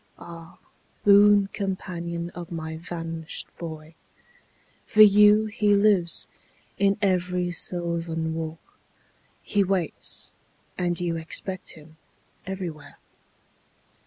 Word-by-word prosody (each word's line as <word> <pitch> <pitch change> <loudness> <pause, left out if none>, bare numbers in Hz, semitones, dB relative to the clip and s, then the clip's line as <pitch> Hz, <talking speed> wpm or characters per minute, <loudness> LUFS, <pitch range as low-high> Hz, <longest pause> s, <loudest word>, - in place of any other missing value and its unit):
Ah, 165 -1 -11 0.5
boon 205 0 +7
companion 170 -3 -4
of 175 -1 -9
my 160 -1 -5
vanished 165 -1 -6
boy. 160 -1 -8 0.9
For 215 - +7
you 210 +1 +6
he 210 -1 +2
lives; 200 -4 +3 0.5
in 200 0 +3
every 180 -2 +1
sylvan 170 -2 -2
walk 160 0 -7 0.6
He 205 -1 +1
waits; 185 -3 -3 0.4
and 175 -2 -1
you 170 -2 -1
expect 185 +3 -4
him 155 +1 -16 0.5
everywhere. 180 -6 -6
175 Hz, 95 wpm, -25 LUFS, 165-195 Hz, 0.9 s, boon